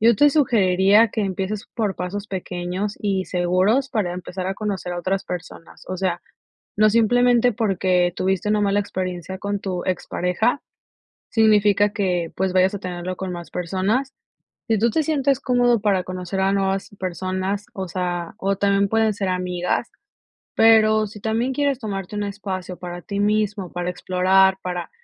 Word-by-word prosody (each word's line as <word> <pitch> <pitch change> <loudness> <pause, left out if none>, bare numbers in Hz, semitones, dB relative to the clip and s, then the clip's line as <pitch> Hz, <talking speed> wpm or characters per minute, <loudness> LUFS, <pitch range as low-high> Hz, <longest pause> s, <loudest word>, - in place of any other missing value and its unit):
Yo 230 0 +5
te 290 +4 +5
sugeriría 210 -6 +4
que 215 - -3
empieces 195 +1 -3
por 210 -5 -1
pasos 195 +3 -4
pequeños 185 +1 -4
y 195 -2 0
seguros, 185 +9 +1
para 205 -8 -1
empezar 180 +1 -5
a 190 - -2
conocer 195 -4 -3
a 175 - -4
otras 190 +2 -1
personas. 180 -2 -8
O 185 - -3
sea, 180 -2 -1 0.6
no 215 +1 +5
simplemente 245 +2 +4
porque, 185 -5 +1
tuviste 190 +2 0
una 210 0 +2
mala 200 0 +2
experiencia 185 -2 -4
con 200 +1 -2
tu 180 -2 -3
expareja, 185 +6 -1 0.7
significa 210 -2 +4
que, 180 -5 -1
pues, 190 0 0
vayas 185 +2 +3
a - - -3
tenerlo 180 -1 -5
con 190 -1 -4
más 175 -1 -8
personas. 195 +10 -1 0.5
Si 225 - +2
tú 235 - +3
te 310 +7 +1
sientes 280 -3 +1
cómodo 245 -3 +2
para 195 -4 +2
conocer 185 +1 -5
a 190 0 +2
nuevas 195 0 0
personas, 185 +2 -3
o 190 -1 -4
sea, 175 -1 -3
o 195 +1 0
también 200 0 +2
pueden 220 0 +2
ser 195 -1 -3
amigas. 180 +4 -1 0.6
Pero, 215 -1 +5
si 210 +1 -11
también 225 +5 -1
quieres 280 -1 0
tomarte 200 -3 -5
un 205 - -1
espacio 190 -3 -5
para 175 0 -7
ti 200 +3 -4
mismo, 205 -2 0
para 175 0 -3
explorar, 185 +1 +3
para 180 -1 -4
195 Hz, 165 wpm, -22 LUFS, 180-215 Hz, 0.7 s, Yo